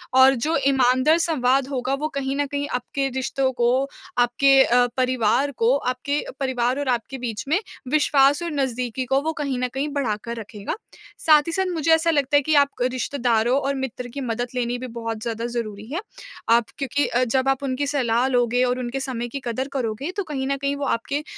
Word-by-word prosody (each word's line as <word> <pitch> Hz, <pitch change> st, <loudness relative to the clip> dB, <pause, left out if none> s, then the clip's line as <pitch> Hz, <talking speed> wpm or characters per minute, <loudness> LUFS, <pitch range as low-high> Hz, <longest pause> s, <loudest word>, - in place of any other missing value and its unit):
और 260 Hz, +1 st, +7 dB
जो 305 Hz, +7 st, -1 dB
ईमानदार 265 Hz, +3 st, +4 dB
संवाद 270 Hz, -5 st, +2 dB
होगा 260 Hz, -1 st, -2 dB
वो 305 Hz, -, 0 dB
कहीं 270 Hz, -1 st, -1 dB
न 290 Hz, 0 st, 0 dB
कहीं 285 Hz, +1 st, -3 dB
आपके 275 Hz, +2 st, -2 dB
रिश्तों 265 Hz, 0 st, 0 dB
को, 245 Hz, +2 st, +2 dB, 0.3 s
आपके 270 Hz, +3 st, +5 dB
अ, 245 Hz, 0 st, +4 dB
परिवार 255 Hz, +1 st, +2 dB
को, 235 Hz, +3 st, +3 dB
आपके 280 Hz, +3 st, -2 dB, 0.2 s
परिवार 255 Hz, -1 st, 0 dB
और 285 Hz, -, -3 dB
आपके 245 Hz, +2 st, -2 dB
बीच 235 Hz, -4 st, -4 dB
में 320 Hz, +7 st, +2 dB, 0.3 s
विश्वास 290 Hz, -1 st, +4 dB
और 340 Hz, -, -3 dB
नज़दीकी 255 Hz, -3 st, -2 dB
को 270 Hz, +2 st, +2 dB
वो 320 Hz, +2 st, -2 dB
कहीं 280 Hz, -4 st, -2 dB
न 250 Hz, -, 0 dB
कहीं 275 Hz, +2 st, -1 dB
बढ़ाकर 235 Hz, -4 st, -2 dB
रखेगा। 210 Hz, -2 st, -6 dB, 0.4 s
साथ 305 Hz, -2 st, +6 dB
ही -, -, -1 dB
साथ 380 Hz, +3 st, 0 dB
मुझे 325 Hz, -1 st, +1 dB
ऐसा 320 Hz, +1 st, +3 dB
लगता 290 Hz, -2 st, +1 dB
है 290 Hz, -, +6 dB
कि 310 Hz, +2 st, +1 dB
आप 285 Hz, -1 st, +5 dB
रिश्तेदारों 245 Hz, -1 st, +1 dB
और 275 Hz, 0 st, -1 dB
मित्र 260 Hz, -2 st, -4 dB
की 280 Hz, -, -4 dB
मदद 240 Hz, -1 st, -2 dB
लेनी 245 Hz, 0 st, -1 dB
भी 255 Hz, +1 st, -6 dB
बहुत 230 Hz, -2 st, -5 dB
ज़्यादा 230 Hz, 0 st, -3 dB
ज़रूरी 220 Hz, -4 st, -4 dB
है। 330 Hz, -, -1 dB, 0.5 s
आप 230 Hz, 0 st, +5 dB
क्योंकि 285 Hz, 0 st, 0 dB
अ, 245 Hz, +1 st, +1 dB
जब 260 Hz, +2 st, +1 dB
आप 270 Hz, +1 st, 0 dB
उनकी 275 Hz, +1 st, -1 dB
सलाह 250 Hz, -3 st, +1 dB
लोगे 245 Hz, -1 st, +2 dB
और 250 Hz, 0 st, 0 dB
उनके 250 Hz, +2 st, -3 dB
समय 250 Hz, -3 st, -3 dB
की 275 Hz, +4 st, -5 dB
कदर 255 Hz, +3 st, -2 dB
करोगे 260 Hz, +4 st, -2 dB
तो 400 Hz, -, 0 dB
कहीं 280 Hz, -5 st, -4 dB
न 275 Hz, 0 st, 0 dB
कहीं 280 Hz, +1 st, -1 dB
वो 280 Hz, 0 st, -3 dB
आपके 280 Hz, +4 st, -1 dB
260 Hz, 200 wpm, -23 LUFS, 245-280 Hz, 0.5 s, और